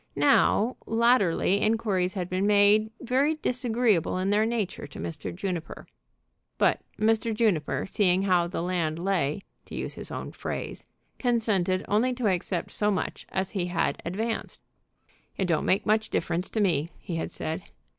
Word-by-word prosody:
Now, 205 - +3
latterly 225 -4 +3
inquiries 210 -4 +1
had 180 -3 -2
been 185 +2 0
made 210 +1 +5
very 270 +5 +2
disagreeable 240 - +1
in 190 +2 0
their 215 +2 +3
nature 215 -10 -2
to 140 - -12
Mr. 155 -3 -5
Juniper; 180 -2 -5 0.7
but - - +3 0.2
Mr. 225 +1 +1
Juniper, 205 -9 +1
seeing 190 -1 +2
how 180 -3 +3
the 175 - -12
the - - 0
land 170 -3 -1
lay, 175 -2 0 0.2
to - - -9
use - - -4
his - - -8
own - - -5
phrase, - - -5 0.3
consented 210 -7 +1
only 230 +5 +2
to 245 -2 -3
accept 185 -2 -1
so 210 - +1
much 195 -3 -3
as 190 0 -2
he 185 -4 -1
had 175 -1 -1
advanced. 220 +6 -3 0.7
"It 190 - +1
don't 165 -3 +1
make 195 - +2
much 220 +1 +2
difference 170 +2 -1
to 220 - -1
me," 165 -5 +1
he 175 -4 -5
had 165 - -3
said. 160 +3 -4
195 Hz, 160 wpm, -27 LUFS, 175-220 Hz, 0.7 s, made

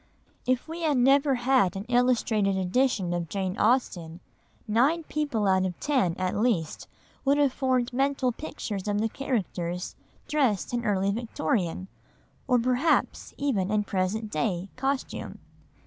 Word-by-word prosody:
If 255 +2 +1
we 330 +2 -6
had 305 -4 +2
never 275 +2 +4
had 245 -6 +2
an 195 - -4
illustrated 235 -5 +2
edition 190 -1 +1
of 170 -2 -3
Jane 190 -2 -2
Austen, 180 -8 +1 0.5
nine 270 +10 +2
people 290 -10 -1
out 190 -1 +3
of 185 -2 -3
ten 255 - +1
at 185 -1 -1
least 205 -8 0 0.4
would 280 +1 +3
have 285 -3 +3
formed 255 -3 0
mental 270 -1 +1
pictures 215 -7 -6
of 205 0 0
the 225 +1 0
characters 180 -9 -3 0.3
dressed 255 - +1
in 240 -1 -1
early 200 -2 +1
Victorian, 190 -4 -2 0.6
or 250 - +4
perhaps 255 +6 +1
even 225 -10 0
in 210 0 +1
present 205 +3 -2
day, 175 +4 -1
costume. 270 +1 -3
230 Hz, 140 wpm, -27 LUFS, 190-265 Hz, 0.6 s, never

